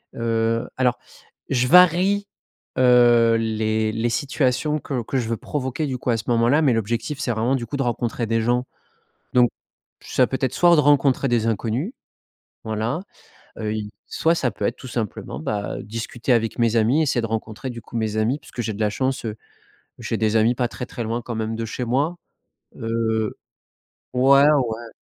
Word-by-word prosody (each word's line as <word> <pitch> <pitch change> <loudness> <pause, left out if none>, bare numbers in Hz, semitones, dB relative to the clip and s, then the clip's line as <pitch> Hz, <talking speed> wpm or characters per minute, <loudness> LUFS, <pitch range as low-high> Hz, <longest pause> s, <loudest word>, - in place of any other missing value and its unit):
heu. 115 0 0
Alors 125 -2 +2 0.5
je 125 -1 +1
varie, 180 +4 +5 0.5
heu, 120 -2 +5
les 110 -1 0
les 115 +2 -1
situations 145 +3 0
que 130 -5 -3
que 135 - -2
je 115 -3 -2
veux 115 - -1
provoquer, 140 +3 -3
du 130 -3 -3
coup, - - -3
à 115 - +2
ce 105 - -5
moment-là, 120 +6 +3
mais 135 -4 +4
l'objectif, 115 +6 -2
c'est 140 - -2
vraiment, 115 +3 0
du 120 -3 -4
coup, 140 - -4
de 135 - 0
rencontrer 120 -1 -2
des 115 0 0
gens. 120 +2 +1 0.7
Donc 125 -1 +5 0.5
ça 130 - +1
peut 130 - -3
être 130 -3 0
soit 175 -1 +5
de 150 - +5
rencontrer 140 -2 +3
des 115 -2 +1
inconnus, 115 - -1 0.7
voilà, 110 +7 -2 0.6
heu, 110 -1 -2
il 105 -1 -4 0.2
soit 165 - +1
ça 130 -6 0
peut 100 0 -4
être, - - 0
tout - - -10
simplement, 115 -5 -4
bah, 100 +5 -3
discuter 115 +3 -2
avec 115 -1 0
mes 115 -1 +2
amis, 115 +7 +3
essayer 130 -5 +1
de 115 - -2
rencontrer, 110 +2 -4
du 120 -2 -7
coup, - - -12
mes 110 -1 -1
amis 115 +7 +1
parce - - -17
que 120 - -4
j'ai 110 - -2
de 100 - -9
la 105 -1 +2
chance, 130 +4 -2
heu, 110 -2 -3 0.6
j'ai - - -3
des 110 0 +1
amis 110 +2 +4
pas 120 0 0
très 125 - -6
très 120 - -6
loin 115 +2 -2
quand 120 - -5
même 110 0 -2
de 115 - -3
chez 120 +3 -4
moi. 140 +8 0 0.6
Heu 115 -1 -1 0.8
ouais, 135 +2 +6
ouais. 120 -6 +1
120 Hz, 190 wpm, -22 LUFS, 110-130 Hz, 0.8 s, ouais